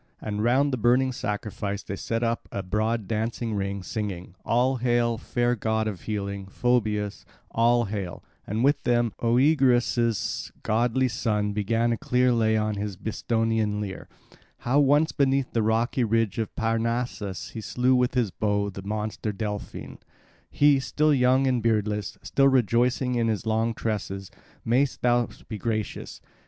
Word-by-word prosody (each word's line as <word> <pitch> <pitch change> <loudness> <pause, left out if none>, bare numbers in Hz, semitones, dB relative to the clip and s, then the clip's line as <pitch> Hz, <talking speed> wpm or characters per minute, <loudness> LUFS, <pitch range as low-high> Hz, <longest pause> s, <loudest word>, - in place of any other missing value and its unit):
And 105 0 -3
round 135 +4 +3
the - - +1
burning 125 +3 +3
sacrifice 105 -4 -4
they 100 - -5
set 115 +4 -2
up 115 0 -2
a 100 - -3
broad 110 +2 -1
dancing 115 +1 -2
ring, 100 -1 -2
singing, 95 -5 -5
"All 125 +3 +2
hail 120 -2 +1
fair 120 0 0
god 110 0 -1
of 100 -5 -5
healing, 100 -2 -4
Phoebus, 105 -2 0 0.3
all 120 +1 +3
hail," 100 -4 -5 0.2
and 110 +4 -1
with 145 +2 +3
them 120 -2 +1
Oeagrus' 120 -3 +2
goodly 120 +4 +2
son 105 -3 -1
began 115 +3 +1
a 115 - 0
clear 125 0 +2
lay 110 -2 +2
on 105 -1 -1
his 100 -2 -4
Bistonian 110 0 -1
lyre; 100 -3 -6 0.6
how 130 +4 +3
once 145 +3 +4
beneath 135 -2 +1
the 115 - +2
rocky 115 +4 +1
ridge 115 -1 +1
of 110 - -3
Parnassus 115 -3 -2
he 110 - -6
slew 125 +4 +1
with 125 0 +2
his 120 -6 +1
bow 100 0 0
the 95 - -8
monster 105 +2 -3
Delphyne, 105 0 -6 0.5
he, 145 -1 +4
still 150 +3 +1
young 130 0 +3
and 125 -2 +1
beardless, 105 -2 0
still 135 0 +3
rejoicing 125 0 +2
in 120 -1 +1
his 110 -1 -1
long 110 +1 0
tresses. 100 -4 -4 0.3
Mayst 130 +4 +1
thou 120 -1 +3 0.2
be 110 -2 -6
gracious! 110 0 -3
115 Hz, 150 wpm, -26 LUFS, 105-125 Hz, 0.6 s, once